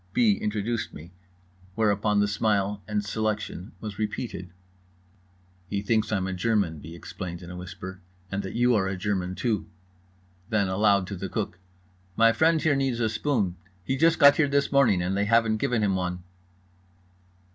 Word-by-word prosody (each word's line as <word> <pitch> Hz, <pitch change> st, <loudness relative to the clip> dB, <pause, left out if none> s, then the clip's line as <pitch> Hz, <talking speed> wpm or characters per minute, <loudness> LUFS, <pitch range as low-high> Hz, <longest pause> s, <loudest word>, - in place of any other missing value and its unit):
B. 115 Hz, -4 st, +4 dB
introduced 105 Hz, +3 st, -2 dB
me, 80 Hz, +4 st, -11 dB, 0.6 s
whereupon 105 Hz, -1 st, +2 dB
the 105 Hz, -, +2 dB
smile 105 Hz, -1 st, 0 dB
and 105 Hz, -1 st, -1 dB
selection 105 Hz, -3 st, -3 dB
was 105 Hz, -2 st, -7 dB
repeated. 105 Hz, -3 st, -4 dB, 1.2 s
"He 100 Hz, +1 st, -2 dB
thinks 110 Hz, +1 st, +1 dB
I'm 95 Hz, -3 st, 0 dB
a 95 Hz, -, -3 dB
German," 95 Hz, -5 st, 0 dB
B. 80 Hz, +3 st, -10 dB
explained 85 Hz, 0 st, -7 dB
in 90 Hz, -, -9 dB
a -, -, -7 dB
whisper, 90 Hz, +1 st, -8 dB, 0.3 s
"and 100 Hz, +1 st, -1 dB
that 95 Hz, -1 st, -7 dB
you 120 Hz, +1 st, +3 dB
are 95 Hz, -4 st, +2 dB
a 95 Hz, -1 st, -3 dB
German 95 Hz, -1 st, -2 dB
too." 110 Hz, -3 st, -1 dB, 0.8 s
Then 105 Hz, -3 st, +2 dB
aloud, 100 Hz, 0 st, +3 dB
to 100 Hz, -, -6 dB
the 95 Hz, +1 st, -5 dB
cook: 100 Hz, -4 st, -3 dB, 0.6 s
"My 115 Hz, 0 st, +6 dB
friend 160 Hz, +6 st, +3 dB
here 155 Hz, -2 st, +2 dB
needs 135 Hz, -3 st, 0 dB
a 115 Hz, -2 st, +1 dB
spoon. 110 Hz, -6 st, 0 dB, 0.3 s
He 130 Hz, -, -1 dB
just 160 Hz, +4 st, +4 dB
got 140 Hz, 0 st, +7 dB
here 150 Hz, -, +4 dB
this 140 Hz, 0 st, +1 dB
morning 120 Hz, -11 st, +4 dB
and 95 Hz, +2 st, -1 dB
they 100 Hz, +1 st, +1 dB
haven't 115 Hz, 0 st, +3 dB
given 120 Hz, -2 st, 0 dB
him 100 Hz, -2 st, +2 dB
one." 90 Hz, -1 st, -3 dB
105 Hz, 170 wpm, -26 LUFS, 95-115 Hz, 1.2 s, got